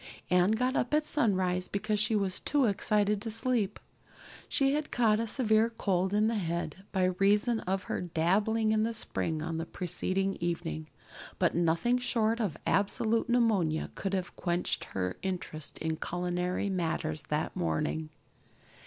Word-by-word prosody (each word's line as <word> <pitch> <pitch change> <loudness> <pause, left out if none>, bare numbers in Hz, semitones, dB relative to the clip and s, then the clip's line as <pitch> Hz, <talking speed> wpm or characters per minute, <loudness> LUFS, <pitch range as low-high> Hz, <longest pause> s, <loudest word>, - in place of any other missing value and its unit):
Anne 180 +1 +5
got 250 +4 +1
up 245 +5 +1
at 300 0 +2
sunrise 185 -10 +1
because 210 +1 -1
she 215 +1 +2
was 195 -3 0
too 285 -2 +2
excited 210 0 +1
to 225 - -4
sleep. 225 -3 0 0.7
She 275 0 +2
had 300 0 -1
caught 220 -3 +3
a 230 - -1
severe 220 -2 +3
cold 190 -5 0
in 210 +1 +3
the 225 -1 +1
head 170 +1 -3
by 190 -2 +1 0.2
reason 210 +4 +3
of 190 +1 -2
her - - -3
dabbling 200 +6 +1
in 215 0 +2
the 225 +1 0
spring 160 -7 -2
on 165 0 -3
the 165 - -3
preceding 185 +2 -1
evening; 120 - -3 0.5
but - - +2
nothing 175 +9 +2
short 230 -2 +1
of 195 -9 -1
absolute 220 +4 +1
pneumonia 210 -10 +2
could 195 0 -2
have 185 -2 -3
quenched 175 0 -1
her 90 -1 -3
interest 175 -5 -5
in 160 0 -2
culinary 180 +3 -2
matters 160 -4 -1
that 150 +1 -1
morning. 80 -2 -1
195 Hz, 155 wpm, -30 LUFS, 175-220 Hz, 0.7 s, Anne